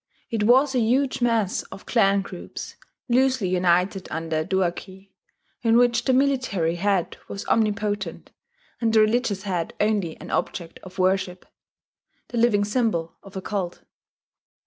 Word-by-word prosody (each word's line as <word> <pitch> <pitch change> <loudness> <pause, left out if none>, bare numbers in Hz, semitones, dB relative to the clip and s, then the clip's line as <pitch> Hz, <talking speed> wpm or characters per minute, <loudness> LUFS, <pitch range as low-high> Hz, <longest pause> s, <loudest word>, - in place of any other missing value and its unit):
It 220 -2 0
was 265 +4 +5
a 255 - +2
huge 255 +4 +1
mass 230 -5 +1
of - - -11
clan 200 -4 +3
groups, 185 -2 -8 0.3
loosely 255 -5 +2
united 180 +1 +1
under 160 0 -2
a - - 0
duarchy, 190 +2 -3 0.5
in 230 -1 +4
which 240 -1 +3
the 265 - +3
military 255 -11 +1
head 195 -1 0
was 200 - -6
omnipotent, 205 -4 -1 0.5
and 230 -2 +1
the 220 - +5
religious 215 -3 +1
head 180 -4 -3
only 205 -6 0
an - - -9
object 170 -2 -3
of 185 0 -12
worship, 185 -1 0 0.8
the 240 - -2
living 215 -3 +3
symbol 205 -7 -1
of 195 -1 -14
a 190 - -5
cult. 190 -4 -4
205 Hz, 145 wpm, -24 LUFS, 185-235 Hz, 0.8 s, was